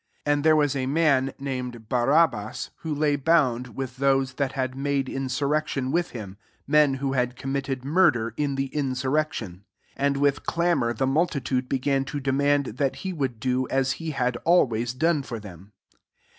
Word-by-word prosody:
7 145 - +3
And 145 -1 -1
there 155 0 +5
was 145 -2 +2
a 130 -1 -1
manf 140 -3 +2
named 125 -4 -5
Barabbas, 125 -2 +1
who 160 - -6
lay 145 0 +2
bound 130 -6 +1
with 130 -1 -5
those 135 -1 +2
that 135 0 -2
had 130 -2 -2
made 140 0 0
insur« 135 +1 -2
rection 145 -3 -1
with 175 +2 0
him, 100 -5 -8 0.3
men 150 -1 +4
who 135 0 -2
had 125 -1 0
committed 135 0 -3
murder 140 - +3
in 145 0 -1
the 135 0 -2
insur 130 -3 -1
rection. 145 - -1
8 - - -25 0.4
And 140 0 +1
with 140 0 +1
clamour 170 -9 +1
the 125 +4 -1
multitude 135 -3 0
began 135 0 +1
to 145 +2 -4
demand 140 -2 +1
that 135 -1 0
he 190 - -2
would 135 -8 -3
do 130 0 0
as 135 0 +1
he 165 +5 -4
had 125 -4 -1
air 170 +7 +4
ways 120 0 -3
done 160 +2 +2
for 120 -4 -6
them. 100 -1 -12
135 Hz, 185 wpm, -25 LUFS, 125-145 Hz, 0.4 s, there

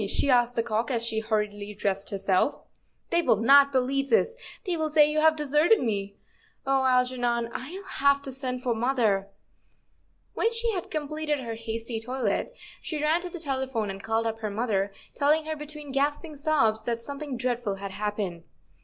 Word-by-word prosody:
she 275 +7 +3
asked 245 -1 +3
the 230 - +1
cock, 225 +1 -1
as 235 -3 0
she 220 -1 +1
hurriedly 210 -2 -2
dressed 195 -1 -2
herself; 195 +4 +1 0.3
" - - -44
they 340 0 +4
will 330 - +4
not 275 +6 +6
believe 275 +1 0
this; 465 +1 +3 0.3
they 360 -3 0
will 315 -1 -1
say 300 -1 +6
you 305 +1 0
have 315 0 +5
deserted 300 +7 +3
me. 200 -4 -2 0.5
Oh, 270 0 +2
Algernon, 245 -2 +1
I'll 340 +10 -6
have 280 -7 +2
to 270 - -3
send 255 -1 -4
for 245 - +1
mother." 225 -5 +1 1.0
When 455 - +1
she 460 0 0
had 370 -5 -4
completed 305 -1 -2
her 230 -2 -4
hasty 225 0 -4
toilet, 245 - -2 0.3
she 310 - -4
ran 310 +3 +2
to 360 - -5
the 350 - -7
telephone 265 - -2
and 195 0 -8
called 225 +1 0
up 225 0 -2
her 215 -1 -3
mother, 205 -2 -1 0.2
telling 305 +2 +2
her 315 0 -3
between 300 -1 -8
gasping 290 +3 -1
sobs 275 -8 +2
that 235 -1 -2
something 280 -1 -5
dreadful 240 -4 -1
had 195 0 -6
happened. 200 -4 -3
255 Hz, 180 wpm, -27 LUFS, 220-295 Hz, 1.0 s, not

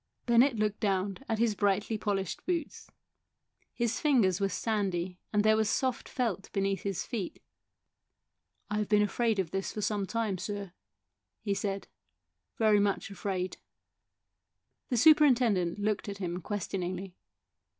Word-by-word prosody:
Bennett 240 +2 +5
looked 210 -1 0
down 195 -1 0
at 225 - +1
his 230 -1 +2
brightly 205 +2 +1
polished 200 -4 -2
boots. 340 -4 -3 0.8
His 235 -1 -1
fingers 215 - +3
were 195 - +2
sandy 190 -5 -1
and 210 -1 +2
there 215 0 +5
was 220 -1 +1
soft 260 0 -1
felt 220 -7 -2
beneath 195 0 0
his 195 -4 -3
feet. 220 -8 -4 0.7
" - - -50
I 210 - 0
have 210 - -2
been 210 -1 +5
afraid 225 +2 +1
of 185 -4 -1
this 195 0 -2
for 210 - -5
some 205 -1 -1
time, 220 -5 -1
sir," 200 -1 -5 0.7
he 205 -2 0
said, 200 0 -3 0.7
"very 215 -2 +4
much 200 -1 0
afraid." 185 -2 -3 1.3
The 245 - +1
superintendent 245 - +5
looked 210 0 -1
at 200 - -5
him 180 -2 -3
ques 205 +1 -3
tioningly. 185 0 -4
205 Hz, 145 wpm, -30 LUFS, 195-225 Hz, 1.3 s, Bennett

